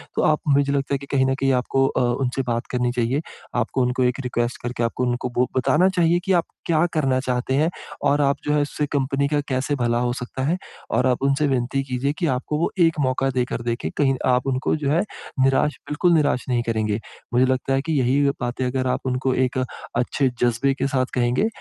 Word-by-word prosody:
तो - - +1
आप 150 - +1
मुझे 140 0 +3
लगता 140 0 -1
है - - +2
कि 140 - -9
कहीं 130 -1 +4
न 135 0 +1
कहीं 135 - +3
आपको 135 +1 +1
अ, - - 0 0.2
उनसे 130 +2 -1
बात 115 0 -1
करनी 125 -1 0
चाहिए। 125 +4 0 0.4
आपको 130 +3 -1
उनको 125 +1 +1
एक 125 +2 +1
रिक्वेस्ट 120 -1 -2
करके 120 -1 -2
आपको 115 +2 -1
उनको 125 +1 -1
बो 125 +1 +2
बताना 160 +8 +3
चाहिए 175 -2 +2
कि 190 - 0
आप - - -27 0.2
क्या 165 0 +3
करना 135 -4 +1
चाहते 125 0 -1
हैं 155 +4 +3 0.4
और 145 +1 +2
आप 140 0 +2
जो 150 - +1
है, 150 - +3
उससे 145 +1 -2
कंपनी 140 0 0
का 145 0 +1
कैसे 130 +3 0
भला 120 -2 0
हो 120 0 0
सकता 125 +1 -5
है 170 +5 +1 0.3
और - - +2
आप 125 0 +1
उनसे 140 +2 +2
विनती 130 +1 0
कीजिए 130 +1 -1
कि 175 - +1
आपको 135 +2 -1
वो - - 0
एक 165 -2 +3
मौका 135 0 +1
देकर 125 -2 -1
देखें, 120 0 -2
कहीं 135 -2 +3
आप 125 +1 +2
उनको 130 +2 0
जो 150 -3 -2
है, 165 - +3 0.4
निराश 135 +3 +2
बिल्कुल 170 +4 +2
निराश 145 -5 +2
नहीं 120 -1 +1
करेंगे। 110 -2 -1 0.3
मुझे 125 +2 +4
लगता 130 +1 0
है 135 - +2
कि 160 +2 -2
यही 130 +3 +2 0.2
बातें 125 +1 -2
अगर 130 0 -1
आप 125 - 0
उनको 130 0 0
एक 125 - -4 0.4
अच्छे 130 +2 +1
जज़्बे 120 +3 +2
के 135 0 -1
साथ 130 -2 +1
कहेंगे, 125 - +2
130 Hz, 220 wpm, -22 LUFS, 125-140 Hz, 0.4 s, कहीं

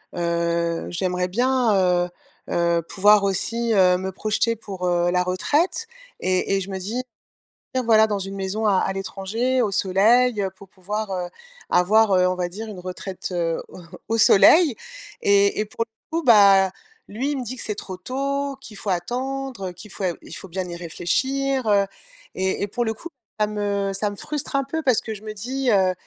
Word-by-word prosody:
heu, 170 -1 -1
j'aimerais 180 0 -1
bien, 245 +4 +2
heu, 180 -2 +2 0.4
heu, 170 0 +1
pouvoir 205 +4 +4
aussi, 230 +4 0
heu, 185 -3 +5
me 190 +1 -4
projeter 215 +4 0
pour, 195 -4 -5
heu, 175 0 +2
la 180 0 +2
retraite 290 - 0 0.4
et 185 +1 +1
et 195 - 0
je 195 +1 -6
me 190 - -4
dis 220 +7 -3 0.7
dire 255 -1 0
voilà 220 -2 +5
dans 205 -2 -1
une 195 +1 -5
maison 195 +3 -2
à 200 - +4
à - - -1
l'étranger, 210 +7 -1
au 215 -4 0
soleil, 210 +5 +3
heu, 190 - -1
pour 190 0 -16
pouvoir, 205 +3 -4
heu, 180 -2 -2 0.4
avoir, 210 +3 +4
heu, 180 -1 +4
on 185 - 0
va 180 -1 -1
dire 210 +6 -7
une 200 -4 -8
retraite, 185 +1 -6
heu, 165 -2 -1
au - - -12 0.3
au 225 +2 0
soleil 230 - +6 0.5
et 200 0 +3
et 215 - +1
pour 220 +2 -3
le 230 +8 -8
coup, - - -6
bah, 200 -6 +6 0.4
lui, 255 +8 -2
il - - -3
me 260 - -3
dit 245 +2 -6
que - - -9
c'est 210 - -3
trop 190 -2 -7
tôt, 275 +6 -2
qu'il 215 -5 -11
faut 205 - -5
attendre, 250 +3 -3
heu, - - -9
qu'il 190 +4 -13
faut 195 - -7
et 180 -2 +1
il - - -11
faut - - -8
bien 185 +1 -3
y 175 - -6
réfléchir, 260 +11 -1
heu 200 -1 +4 0.5
et 190 +1 -1
et - - -1
pour 240 +4 -2
le 220 -1 -1
coup, 340 - -9 0.3
ça 210 - +4
me 205 -1 -1
ça 205 +2 -1
me 205 - -8
frustre 295 +6 -5
un 275 - +2
peu 320 +4 -3
parce 255 -7 +2
que 220 - -5
je 205 - -9
me 215 0 -6
dis, 255 +5 -2
heu: 190 -3 +3
200 Hz, 205 wpm, -23 LUFS, 185-235 Hz, 0.7 s, soleil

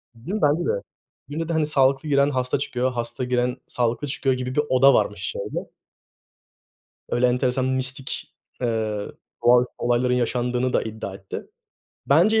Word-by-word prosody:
Değil 155 - -5
mi, 215 - -2
bence 150 +3 +3
de. - - +2 0.6
Birinde 160 +3 -3
de, 165 - 0
hani, 160 -1 +2
sağlıklı 140 0 +2
giren 140 0 +4
hasta 130 -2 0
çıkıyor, 130 -2 -1
hasta 120 +1 -3
giren 125 0 0
sağlıklı 120 +4 -1
çıkıyor 135 -1 0
gibi 125 0 -4
bir 150 - +4
oda 135 +2 +6
varmış 105 -2 +1
şeyde. - - -4 1.4
Öyle 120 +1 +3
enteresan 125 +1 +1
mistik, 130 0 -3 0.3
eee, 110 -3 -1 0.4
doğaüstü 125 +1 +5
olayların 120 +1 +1
yaşandığını 125 +1 0
da - - +3
iddia 110 -3 -6
etti. 95 -1 -7 0.6
Bence 220 +1 +5
125 Hz, 150 wpm, -24 LUFS, 120-140 Hz, 1.4 s, oda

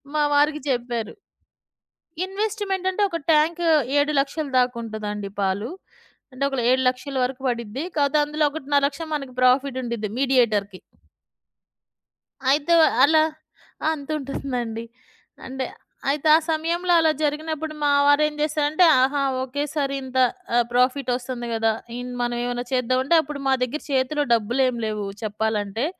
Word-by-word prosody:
మా 305 - +2
వారికి 295 +1 +3
చెప్పారు. 240 -3 -2 1.1
ఇన్వెస్ట్‌మెంటంటే, 390 -1 -2
ఒక 335 - -2
టాంకు 325 +3 +2 0.3
7,00,000ల 290 +1 +1
దాకుంటదండి 220 -5 -2
పాలు. 200 +4 -1 0.6
అంటే 255 +2 -4
ఒకేల 270 -3 -2
7,00,000ల 260 +1 0
వరకు 255 +1 -3
బడిద్ది. 235 +3 -4
కాపోతే 285 +1 +2
అందులో 300 +1 0
1,50,000 285 0 0
మనకు 275 -3 -6
ప్రాఫిటుండిద్ది 250 -4 +1
మీడియేటర్‌కి. 220 -8 +1 1.7
అయితే 295 +4 +2 0.3
అలా 310 +2 +5 0.6
ఆ! - - +2
అంతుంటుందండి. 275 -6 -4 0.6
అంటే, 265 0 -4 0.4
అయితే 290 +2 0
ఆ - - +7
సమయంలో 340 +3 0
అలా 320 -1 +4
జరిగినప్పుడు 310 +1 -2
మా 290 - +3 0.2
వారేం 300 +1 +4
జేసారంటే 305 +3 +2 0.2
ఆహా! 275 +2 +2 0.2
ఒకేసారి 285 +1 -2
ఇంత 260 0 -5 0.4
ఆహ్, 240 - +5
ప్రాఫిటొస్తుంది 250 -1 0
గదా! 225 0 +1 0.2
ఇన్ 250 0 -6
మనవేవన్నా 240 0 -2
చేద్దామంటే 255 +4 +2
అప్పుడు 295 -1 -7
మా 265 - +4
దగ్గర 255 +5 -3
చేతిలో 275 +3 +1
డబ్బులేమి 240 +3 +1
లేవు 210 -1 -3 0.2
చెప్పాలంటే. 215 +1 -2
270 Hz, 115 wpm, -23 LUFS, 240-300 Hz, 1.7 s, ఆ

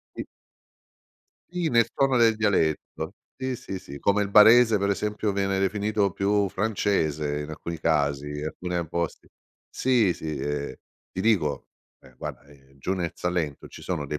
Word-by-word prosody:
Sì. - - -4 1.3
Sì 175 -3 -1
nel 115 -1 +3
tono 135 -2 +2
del 115 -2 +4
dialetto. 100 -8 0 0.2
Sì, 130 -1 -3
sì, 95 -4 -6
sì, 70 -5 -10
come 100 +1 +2
il 100 - -2
barese 110 +2 +7
per 100 0 0
esempio 105 +1 -1
viene 100 -1 0
definito 100 0 +1
più 100 +2 +1
francese 80 -9 0
in 75 - -6
alcuni 85 +1 -6
casi, 70 -3 +1
in 75 0 -5
alcune 90 +2 -3
posti. 85 +1 -3 0.4
Sì, 120 -8 +2
sì, 80 -2 -5
ehm, 70 +1 -3 0.4
ti 95 - -4
dico, 95 -10 +1 0.3
ehm, 65 - -19
guarda, - - -7
ehm, 70 -1 -21
giù 90 +8 -2
nel 90 -3 -2
Salento 85 -5 -2
ci - - -12
sono 85 -5 -3
dei 75 +1 -4
95 Hz, 160 wpm, -26 LUFS, 75-105 Hz, 1.3 s, barese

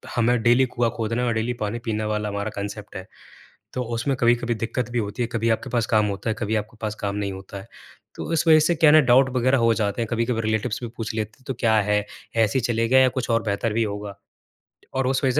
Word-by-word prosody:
हमें 120 0 +2
डेली 120 +2 +5
कुआँ 120 -1 0
खोदना 115 +1 -1
है 125 - 0
और 120 - +1
डेली 115 +2 -1
पानी 105 +2 -2
पीने 110 -2 -1
वाला 105 0 -1
हमारा 100 +1 -3
कान्सेप्ट 100 +1 -6
है। 95 +1 -7 0.7
तो 130 - -2
उसमें 130 +4 -1
कभी-कभी 120 0 +2
दिक्कत 115 +2 -3
भी 120 - -1
होती 105 +2 -2
है। - - 0
कभी 115 0 0
आपके 115 +4 -1
पास 115 -1 0
काम 110 -2 +2
होता 100 +3 -3
है, 110 - 0
कभी 110 0 0
आपके 105 +2 -4
पास 110 -1 -2
काम 100 0 -2
नहीं 100 -1 -2
होता 95 +1 -9
है। - - -13 0.5
तो - - -5
इस 165 - +1
वजह 160 -1 +8
से 155 +3 +2
क्या 155 -2 +5
है - - +6
ना, - - +8
डाउट 130 +2 +5
वग़ैरह 130 +2 +3
हो 115 -1 +3
जाते 110 +2 -1
हैं, 115 - -1
कभी-कभी 115 0 0
रिलेटिव्स 110 +2 -1
भी 120 - -4
पूछ 115 -1 -4
लेते 110 +1 -4
हैं, 130 - -26
तो 135 - -3
क्या 115 -3 +3
है? 105 0 +1 0.3
ऐसे 115 +3 +2
ही 125 - -1
चलेगा 120 +2 +2
या 130 0 +6
कुछ 125 - -3
और 115 0 +2
बेहतर 110 +1 -1
भी 115 +2 +1
होगा? 100 -1 -5 0.8
और 130 -1 0
उस 130 +1 0
वजह 130 - +3
115 Hz, 255 wpm, -23 LUFS, 105-125 Hz, 0.8 s, वजह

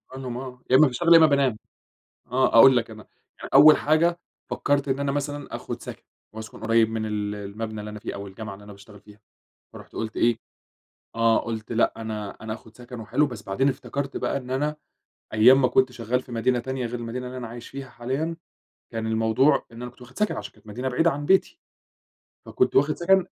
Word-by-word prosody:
آه، 125 -1 -7
يا 130 - +5
إمّا 150 +2 +7
باشتغل 170 +7 +3
يإمّا 165 -1 +8
بانام، 140 -6 +2 0.7
آه 125 -2 +3
أقول 130 +2 +8
لك 115 -1 0
أنا، 110 -1 -10 0.4
ي - - -6
أول 150 +3 +9
حاجة 165 +3 +2 0.3
فكّرت 140 0 0
إن 135 0 0
أنا 140 -1 0
مثلًا 145 0 -4
آخُد - - -7
سَكَن، - - -9 0.3
وأسكن 110 0 -9
قريّب 115 0 +3
من 110 -1 -3
ال 105 -1 -3
المبنى 105 +2 -6
اللي 105 0 -7
أنا 105 - -8
فيه - - -6
أو 100 0 -7
الجامعة 100 +1 -8
اللي 105 - -14
أنا 105 - -11
باشتغل 100 +1 -15
فيها، 105 0 -18 0.5
فرُحت - - -13
قُلت 110 -1 -5
إيه، 120 -1 +3 0.8
آه 115 0 +4
قُلت 110 -1 -5
لأ 115 - +2
أنا 110 -2 -5
أنا 110 0 -5
آخُد 110 0 -15
سَكَن 120 -1 -9
وحلو 145 +7 +1
بس 120 -5 -8
بعدين 110 +7 0
افتكرت 140 +1 -4
بقى - - -1
إن 130 -2 -6
أنا 150 +3 -1 0.6
أيام 130 +5 +6
ما 125 - +4
كنت 130 +1 +2
شغّال 125 +1 -2
في 125 - -15
مدينة 120 +2 +1
تانية، 130 +1 -4
غير 120 +1 -4
المدينة 120 +2 -5
اللي 130 +1 -7
أنا 120 -2 -5
عايش 120 +1 -10
فيها 135 -1 -8
حاليًا، 135 +8 -3 0.6
كان 115 -1 -3
الموضوع 115 +6 +2
إن 115 +1 -10
أنا 125 0 -6
كنت 125 - -24
واخد 125 +1 -12
سَكَن 210 - +1
عشان 105 -1 -7
كانت - - -23
مدينة 125 +5 -4
بعيدة 165 +6 +2
عن 145 +1 -4
بيتي، 190 - +2 0.9
فكنت 380 - 0
واخد 145 +3 +3
سَكَن 190 +1 +3
125 Hz, 205 wpm, -25 LUFS, 110-140 Hz, 0.9 s, أول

